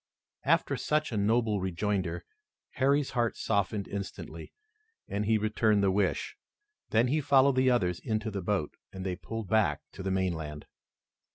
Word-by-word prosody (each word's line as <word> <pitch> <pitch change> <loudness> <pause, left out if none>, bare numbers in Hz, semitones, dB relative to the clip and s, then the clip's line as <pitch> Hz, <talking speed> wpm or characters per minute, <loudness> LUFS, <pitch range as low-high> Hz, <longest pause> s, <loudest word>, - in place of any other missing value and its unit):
After - - +2
such 150 -1 0
a - - -3
noble 105 0 +2
rejoinder 95 -1 -2 0.5
Harry's 140 +1 +2
heart 120 -3 0
softened 100 -1 0
instantly, 100 -1 -6 0.6
and 105 +1 -2
he 110 0 +4
returned 110 -1 +2
the 95 - +4
wish. 100 0 0 0.5
Then 115 +3 +3
he 155 +3 +2
followed 140 -1 +4
the 130 0 +4
others 90 -8 +1
into 110 -1 -2
the 100 -1 -3
boat, 95 -4 -1 0.2
and 95 0 -7
they 90 -1 -1
pulled 115 +3 -6
back 110 +2 +2
to - - -9
the 95 - -2
mainland. 80 -6 -2
105 Hz, 155 wpm, -30 LUFS, 95-115 Hz, 0.6 s, he